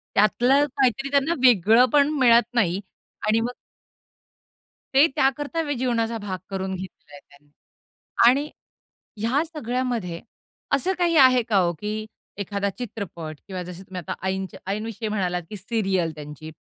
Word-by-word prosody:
त्यातलं 250 +7 +4
काहीतरी 270 +1 +1
त्यांना 280 +3 +2
वेगळेपण 250 - +5
मिळत 235 -2 +5
नाही 190 -5 +2 0.5
आणि 220 +1 +3
मग 240 +2 -2 1.4
ते 275 +3 +7
त्याकरता 290 +4 0
वे 290 - 0
जीवनाचा 235 -2 0
भाग 200 -3 -5
करून 190 -1 -3
घेतला 185 -5 -10
आहे 145 - -10
त्यांनी. 145 +1 -22 0.8
आणि 280 +5 +3 0.7
ह्या 245 +8 +1
सगळ्यामध्ये 245 - -3 0.5
असं 380 +2 0
काही 345 -1 +2
आहे 255 -3 +7
का 210 - +3
हो, 175 -2 +2
की 210 +5 -4 0.3
एखादा 200 0 -2
चित्रपट 190 -8 -7
किंवा 185 -2 -5
जसे 180 +1 -9
तुम्ही 185 -1 -7
आता - - -2
आईंचं 190 0 -3
आईंविषयी 215 +1 -4
म्हणालात 180 -4 -1
की 210 - -7
सीरियल 190 -4 -1
त्यांची. 150 +1 -9
215 Hz, 135 wpm, -24 LUFS, 190-255 Hz, 1.4 s, ते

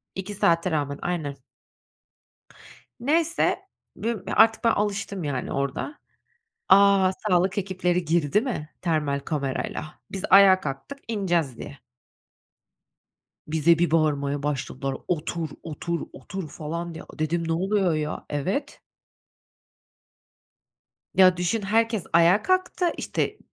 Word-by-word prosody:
2 190 +2 -5
saate 170 0 +2
rağmen, 145 -2 -1
aynen. 160 -6 -2 1.6
Neyse, 330 +7 +1 0.3
bü 230 0 -3
ya - - -2
artık 225 +1 +5
ben 230 - +4
alıştım, 200 -3 -2
yani, 140 -4 -3
orada. 140 - -3 0.7
A, 195 -1 +6 0.2
sağlık 185 +1 +2
ekipleri 180 -2 0
girdi 165 +3 +2
mi 220 - -4
termal 150 -5 0
kamerayla? 145 +1 -4
Biz, 195 - -5
ayağa 190 -1 +8
kalktık 140 - -6
ineceğiz, 175 - 0
diye. 145 - -9 1.7
Bize 160 +2 +3
bir 175 -2 +2
bağırmaya 145 -3 +1
başladılar, 135 -1 -3
"Otur, 165 -1 -2
otur, 170 +2 -4
otur!" 190 -5 -7
falan 170 +3 -5
diye. - - -8 0.2
Dedim, 165 +1 -1
ne 165 - +1
oluyor, 190 0 +1
ya? 155 0 -3
Evet. 190 - -2 2.3
Ya, 185 -2 +6
düşün 180 +5 0
herkes 220 0 +1
ayağa 170 +5 +5
kalktı. 370 -1 +1
İşte, - - -2
175 Hz, 110 wpm, -25 LUFS, 150-200 Hz, 2.3 s, ayağa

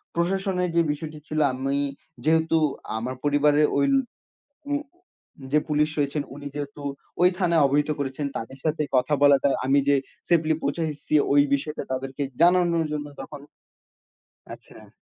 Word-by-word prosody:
প্রশাসনের 180 +1 0
যে 170 - +5
বিষয়টি 155 +1 -6
ছিল, 155 0 -2
আমি 135 +2 -1 0.5
যেহেতু 160 +1 +3 0.4
আমার 125 +3 -4
পরিবারে 145 +1 +3 0.2
ওই 140 - +3 0.9
উম 290 +1 0 0.7
যে 150 - +5
পুলিশ 150 0 +2
রয়েছেন, 145 +1 0
উনি 145 0 -9
যেহেতু 145 0 -6 0.4
ওই 180 - +8
থানায় 170 -5 +3
অবহিত 145 +2 +1
করেছেন, 140 +1 -3
তাদের 130 +4 -6
সাথে 155 -1 0
কথা 130 +4 +2
বলাটা 140 0 +5 0.2
আমি 140 +1 +4
যে 140 - +5 0.3
সেফলি 160 -2 +3
পৌঁছাইছি 150 +1 -2 0.2
ওই 145 0 +6
বিষয়টা 150 +2 -3
তাদেরকে 135 +2 -4 0.2
জানানোর 170 -1 +4
জন্য 145 -1 -3
তখন 140 +1 -8 1.1
আচ্ছা। - - -17
150 Hz, 135 wpm, -25 LUFS, 140-160 Hz, 1.1 s, ওই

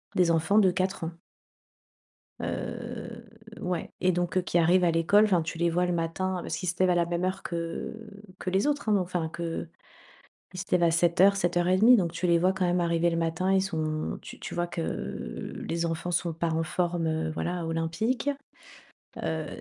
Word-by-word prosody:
des 180 -2 +4
enfants 165 +6 +3
de 190 -3 +5
4 185 -1 -1
ans. 165 - -3 1.3
Heu, 235 -1 -5 0.4
ouais, 180 -3 -3
et 185 - +4
donc, 175 -1 -1
heu, - - +4
qui 175 - 0
arrivent 175 +2 +4
à 175 - +4
l'école, 165 +6 +4
enfin, 185 -5 +3
tu 160 +1 -5
les 170 0 +2
vois 175 +2 +1
le 180 - 0
matin 175 +3 -1
parce 160 - -4
qu'ils 185 - -4
se 175 - -2
lèvent 185 0 +4
à 180 - +3
la 170 -1 +3
même 170 +1 -2
heure 185 +1 -2
que 170 +5 -4 0.4
que - - -3
les 190 +7 +1
autres, 290 -6 0
hein, 210 - +4
enfin 175 -3 -2
que 165 0 -4 0.9
ils 180 - -6
se 195 - -4
lèvent 180 -1 +4
à 170 - +4
07:00, 175 +4 +4
07:30 185 +5 +4
donc, 175 -5 0
tu 175 +2 -2
les 170 -1 +5
vois 185 +3 +2
quand 190 -1 0
même 175 0 +2
arriver 170 0 +2
le 165 - -1
matin 165 +3 0
ils 190 0 +4
sont 155 -5 -2
tu - - -11
tu - - -7
vois 175 0 0
que 170 - -4 0.9
les 170 0 -1
enfants 165 +2 -3
sont 170 -1 0
pas 165 +1 -1
en 160 0 0
forme, 175 0 -1
heu, 160 0 -1
voilà, 175 +2 -3
olympique. 165 +12 -1 0.9
Heu, 160 -1 -2
175 Hz, 200 wpm, -28 LUFS, 165-185 Hz, 1.3 s, de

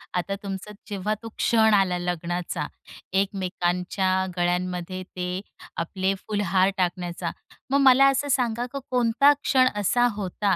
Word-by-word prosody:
आता 190 +2 -1
तुमचं 195 +1 -5 0.2
जेव्हा 205 +1 -1
तो 225 - -6
क्षण 220 -2 +4
आला, 190 -3 +3
लग्नाचा, 175 -2 -3 0.6
एकमेकांच्या 185 -1 -1 0.3
गळ्यांमध्ये 180 +1 -1
ते 180 +1 -3 0.4
आपले 190 +3 -1
फुलहार 195 -3 +2
टाकण्याचा. 175 -1 -2 0.4
मग 280 +1 +3
मला 265 +2 +6
असं 285 +2 -1
सांगा, 240 -2 +1
की 275 - -4
कोणता 250 +3 +4
क्षण 255 -2 +4
असा 240 +5 +3
होता, 200 0 0
190 Hz, 125 wpm, -25 LUFS, 180-220 Hz, 0.6 s, मला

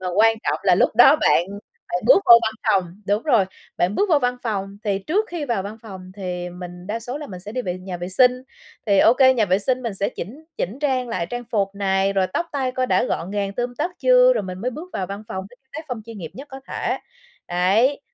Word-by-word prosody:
mà 185 - -5
quan 225 +1 +5
trọng - - 0
là 185 -2 +5
lúc - - +3
đó 270 +5 +8
bạn 170 - +3 0.5
bạn - - -2
bước - - +6
vô 235 - +10
văn 220 - 0 0.2
phòng 190 0 0
đúng 205 +3 +1
rồi, 240 -10 +3 0.3
bạn 180 +3 +1
bước 410 - +1
vô 305 - +5
văn 250 -2 0
phòng 200 -3 -3
thì 200 -2 0
trước 370 - 0
khi 340 -4 -4
vào 235 -8 -1
văn 205 +3 -7
phòng 190 -4 -10
thì 180 -2 -4
mình 180 0 -9
đa 220 +3 -3
số 245 +5 -5
là 295 - -7
mình 185 -6 -9
sẽ 205 +4 -8
đi 255 - -2
vệ 180 -5 -3
nhà 185 -1 -6
vệ 175 +1 -5
sinh, 250 +5 +3 0.4
thì 200 -2 +3
OK, 230 +5 +5 0.2
nhà 225 - +3
vệ 185 0 +2
sinh 255 +4 0
mình 230 -5 -3
sẽ 195 - -1
chỉnh 265 - -8
chỉnh 205 +9 -3
trang 260 -4 0
lại 170 - -2
trang 245 +6 -5
phục 200 -3 -1
này, 195 0 +1
rồi 190 -1 +1
tóc 340 - -1
tai 260 -3 -1
coi 255 0 -1
đã - - +2
gọn 185 -6 -3
gàng 200 -1 -2
tươm 245 +1 -3
tất 350 - -1
chưa, - - +6
rồi - - -1
mình 185 -1 -6
mới 250 - -1
bước 320 +8 -9
vào 185 - -3
văn 200 +3 -7
phòng 190 0 -5
với 245 - -18
cái 265 - -47
tác 315 +2 -7
phong 235 -4 -5
chuyên 230 -2 -9
nghiệp 165 -4 -7
nhất 275 +3 -10
có 270 0 -9
thể. - - -2 0.5
Đấy, 200 +11 +2
215 Hz, 260 wpm, -22 LUFS, 190-255 Hz, 0.5 s, vô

